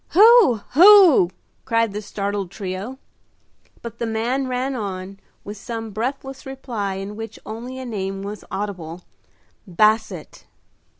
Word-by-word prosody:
"Who? 420 - +6
who?" 355 - +7 0.3
cried 230 -2 0
the 210 - -4
startled 200 -2 -4
trio. 200 +6 -6 0.9
But 235 -1 -8
the 235 - -2
man 240 +4 -1
ran 255 +2 -2
on, 195 -4 -6 0.2
with 205 +1 -8
some 225 +1 -6
breathless 265 +5 -4
reply, 240 -7 -5
in 195 +2 -6
which 225 0 -8
only 235 +4 -7
a 260 - -6
name 195 -4 -4
was 205 +1 -7
audible 180 -4 -5 0.6
"Basset." 215 +5 0
220 Hz, 125 wpm, -21 LUFS, 200-255 Hz, 0.9 s, who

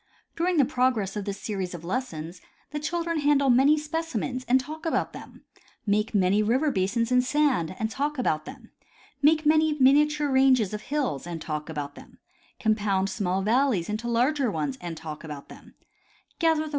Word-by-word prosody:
During 350 +1 0
the 280 - +5
progress 245 -7 0
of 205 -2 -4
this 200 -1 -4
series 190 -4 -4
of 170 - -9
lessons 180 -6 -4 0.3
the 295 - -3
children 335 +1 -2
handle 285 -2 +3
many 275 +5 +5
specimens 300 -5 -3
and 255 +2 +4
talk 310 +4 -8
about 325 - -1
them; - - -12 0.4
make 210 +1 0
many 195 +1 +3
river 260 +8 +2
basins 225 +4 0
in 250 0 +5
sand 260 - +1
and 220 0 -2
talk 290 +3 -2
about 155 -11 0
them; - - -11 0.5
make 310 +1 +4
many 310 0 +4
miniature 295 +2 +4
ranges 260 -6 +4
of 210 - -4
hills 260 - -2
and 170 -1 -5
talk 155 0 -5
about 145 -2 -5
them; - - -15 0.4
compound 205 -3 +1
small 190 -2 -1
valleys 225 -5 +2
into 215 +3 -3
larger 250 +3 +1
ones 150 -8 -2
and 170 -2 -6
talk 155 -1 -8
about 150 -3 -8
them; - - -14 0.6
gather 320 -2 +3
the. - - -7
240 Hz, 175 wpm, -26 LUFS, 190-295 Hz, 0.6 s, the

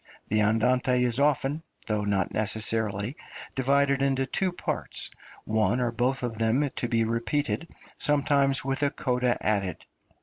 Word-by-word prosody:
The 105 +1 +2
Andante 125 +4 +2
is 120 +1 +1
often, 145 +1 +1 0.2
though 105 -2 -1
not 100 -3 0
necessarily, 110 +1 +2 0.4
divided 140 +1 +2
into 135 -1 +1
two 185 +6 -1
parts, 175 - -3 0.3
one 110 +3 +1
or 120 -1 0
both 125 +3 -1
of 115 -2 -4
them 115 +6 +2
to 120 - -1
be 115 -1 +1
repeated, 115 +8 -2 0.3
sometimes 140 -2 +2
with 135 +1 -1
a 145 - +3
coda 125 -2 0
added. 100 -5 -1
125 Hz, 140 wpm, -27 LUFS, 110-140 Hz, 0.4 s, a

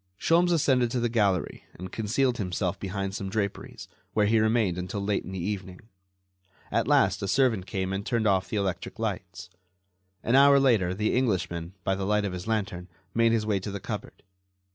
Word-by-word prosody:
Sholmes 175 +2 +3
ascended 130 -7 +3
to 125 - -1
the 120 0 0
gallery 100 -7 0
and 90 +1 -8
concealed 120 +3 0
himself 90 -2 -2
behind 95 0 -3
some 100 -1 -4
draperies, 100 -1 -4 0.3
where 105 -1 +3
he 110 +2 +3
remained 110 -5 +1
until 90 +4 -4
late 100 0 -1
in - - -8
the 95 - -5
evening. 95 -3 -5 0.9
At - - +1
last - - +3
a 100 - -2
servant 115 -5 +2
came 95 0 -2
and 100 +1 -2
turned 115 0 -1
off 95 -2 +2
the 110 - -2
electric 95 +1 -3
lights. 95 -4 -5 0.7
An 115 - 0
hour 140 0 +7
later 110 -10 +2
the 105 +2 0
Englishman, 95 -7 -1
by 95 - +1
the 95 0 -3
light 105 0 +2
of 95 - -3
his 90 +2 -6
lantern, 100 -5 -2 0.3
made 115 0 +3
his 115 -2 +1
way 105 -2 +1
to 95 - -6
the 100 0 -5
cupboard. - - -7
100 Hz, 190 wpm, -27 LUFS, 95-115 Hz, 0.9 s, hour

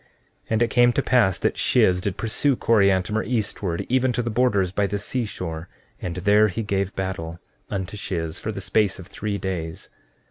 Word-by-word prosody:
14:26 - - -33 0.4
And 110 0 +1
it 120 - 0
came 120 -1 +5
to - - +1
pass 115 -8 +3
that - - -1
Shiz 90 0 +3
did 100 0 -3
pursue 125 +5 +2
Coriantumr 105 -2 +2
eastward, 100 -7 -2
even 130 0 +2
to 120 - 0
the 120 - -2
borders 105 -6 +2
by 100 +1 0
the 100 +1 -2
seashore, 90 -7 -3 0.3
and 85 -2 -4
there 105 +3 +4
he 105 +3 -3
gave 100 -2 -1
battle 85 -3 -4 0.3
unto 95 0 -4
Shiz 85 -6 -4
for - - -3
the - - -6
space 105 -3 +1
of 95 - -10
three 105 +3 -4
days. 85 -5 -5
100 Hz, 185 wpm, -23 LUFS, 90-110 Hz, 0.4 s, came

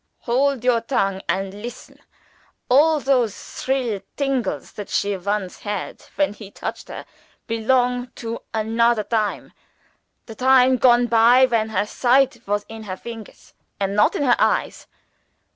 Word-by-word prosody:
_ - - -52 0.2
Hold 260 +1 0
your 245 -2 +3
tongue 195 -6 -1
and 190 +2 -1
listen. 245 +2 -9 0.7
All 300 +5 +5
those 250 -7 +1
thrill 250 -7 -3 0.2
tingles 255 - -2
that 205 - -8
she 200 0 0
once 195 0 -3
had 205 -2 -5
when 290 -7 +1
he 210 -1 -11
touched - - -7
her, - - -8 0.4
belong 245 +2 +1
to 230 0 -5
anodder 225 0 +1
time 215 -3 -2 0.7
the 225 - -9
time 260 +1 +4
gone 245 -1 +5
by 235 +2 +5
when 230 -3 0
her 205 -1 0
sight 250 +2 +2
was 205 0 -1
in 220 -1 -9
her 185 -2 -5
fingers 225 -1 -11 0.3
and 195 0 -1
not 210 - +3
in - - -1
her 245 -3 +3
eyes. - - 0
230 Hz, 145 wpm, -21 LUFS, 210-255 Hz, 0.7 s, All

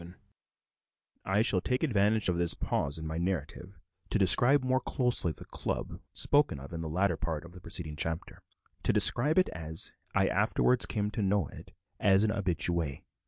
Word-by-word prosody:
VII 85 +1 -12 1.1
I 95 +2 +1
shall 95 -6 +1
take 125 - -2
advantage 110 -5 +1
of 90 - +1
this 85 -1 +3
pause 70 +2 -2
in 80 - -7
my 80 +1 -4
narrative 90 +1 -4 0.3
to - - +1
describe 120 +8 +5
more 130 0 0
closely 125 - +2
the - - -11
"Club" - - -5
spoken 145 - +3
of 70 +4 -11
in 85 - -5
the 80 - -5
latter 95 +5 0
part 80 -1 -4
of 85 - -13
the 90 0 -13
preceding 80 -3 -3
chapter 80 +2 -3 0.4
to - - +1
describe 150 +7 +3
it 185 - +3
as 80 0 -2 0.2
I 95 -1 +3
afterwards 110 +5 +2
came 105 -1 -2
to 110 - -4
know 100 -4 0
it, - - -13 0.3
as 95 +1 +3
an 110 - +1
habitué. 85 -7 -2
95 Hz, 180 wpm, -29 LUFS, 85-110 Hz, 1.1 s, describe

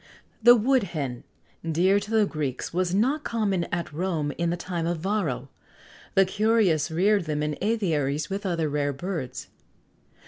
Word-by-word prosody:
The 240 +2 +8
Wood 255 +3 +3 0.2
Hen, 125 -4 -3 0.4
dear 175 +5 +3
to 205 - -8
the 220 -1 +3
Greeks,[XX 145 -8 -3
84] 170 - -6
was 185 0 +1
not 270 +9 +1
common 200 -6 0
at 170 -3 -4
Rome 160 -3 -1
in 170 0 +1
the 175 - -1
time 175 -2 -3
of 170 0 -1
Varro. 160 -8 -2 0.7
The 195 - +6
curious 200 -6 +2
reared 190 +3 +2
them 150 -1 -1
in 150 0 -1
aviaries 155 -9 0
with 195 +1 -4
other 170 -5 0
rare 145 -1 -1
birds. 135 -5 -5
175 Hz, 165 wpm, -26 LUFS, 150-205 Hz, 0.7 s, The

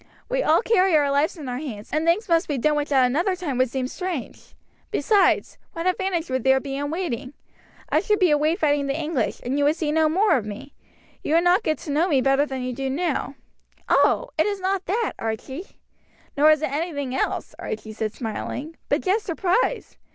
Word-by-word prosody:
We - - 0
all - - +3
carry 380 -7 +3
our 285 -2 +2
lives 300 +6 +1
in 295 -4 -7
our 250 0 -3
hands, 225 -9 -7
and 310 +1 +1
things 375 +7 +2
must 335 0 +2
be 290 - -1
done 300 +4 +2
which 295 0 -2
at 265 -2 +5
another 340 +10 +1
time 300 -9 -3
would 255 -1 +3
seem 255 0 -2
strange. 355 -3 -6 0.3
Besides, 410 - +2
what 330 +1 -4
advantage 370 -2 0
would 260 -2 -1
there 265 0 +4
be 270 0 -5
in 285 +1 -3
waiting? 290 -6 -3 0.6
I - - +3
should 420 - +1
be 365 -5 +3
away 300 +2 +3
fighting 290 -5 +1
the 275 +3 -1
English, 305 -7 -1
and 265 +4 -1
you - - +2
would 300 +2 +3
see 310 -3 -1
no 315 0 +3
more 390 +7 +3
of 235 - -3
me. 210 +7 -8 0.5
You 310 - +1
would 335 - +4
not 355 +4 +4
get 310 -8 0
to 300 - -4
know 315 +5 +2
me 290 -7 +3
better 275 +2 +2
than 265 -2 -4
you 250 0 -3
do 270 +2 -3
now." 285 -1 -2 0.5
"Oh! - - +3
it 315 - +4
is 405 -1 -2
not 380 0 -1
that, 435 +4 0
Archie." 260 - -5 0.6
"Nor 295 +2 +5
is 310 0 +4
it 265 - -1
anything 285 -4 -3
else," 265 - -2
Archie 215 0 -6
said 215 0 -3
smiling, 260 +7 -5
"but - - +2
just 410 +3 +1
surprise. 390 +7 -1
300 Hz, 215 wpm, -23 LUFS, 270-360 Hz, 0.6 s, at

